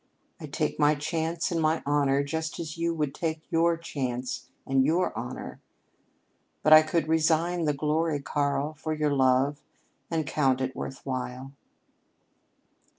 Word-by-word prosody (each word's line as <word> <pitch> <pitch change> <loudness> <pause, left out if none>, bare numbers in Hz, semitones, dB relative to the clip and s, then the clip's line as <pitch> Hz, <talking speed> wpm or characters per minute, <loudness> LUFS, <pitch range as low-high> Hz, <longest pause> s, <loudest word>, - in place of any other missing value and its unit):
I - - -7
take - - -2
my 150 0 +4
chance 160 +3 -2
and 165 -1 0
my 155 +1 +1
honor 140 -1 +2
just 160 +2 -3
as 160 -3 -5
you 170 0 0
would 150 -4 -2
take 160 0 -3
your 165 0 +3
chance 130 -6 -4 0.2
and 135 0 +3
your 165 +6 +1
honor. - - -6 1.0
But 155 - +7
I 155 - +11
could 155 0 -1
resign 160 +2 +2
the 150 - +2
glory, 155 +1 0
Karl, 145 +1 -1
for 155 +1 -4
your 150 -1 +1
love, 135 +2 +2 0.5
and 160 -2 -1
count 135 -3 +1
it 130 0 -2
worth 135 - -6
while." 130 0 -4
155 Hz, 150 wpm, -27 LUFS, 140-160 Hz, 1.0 s, I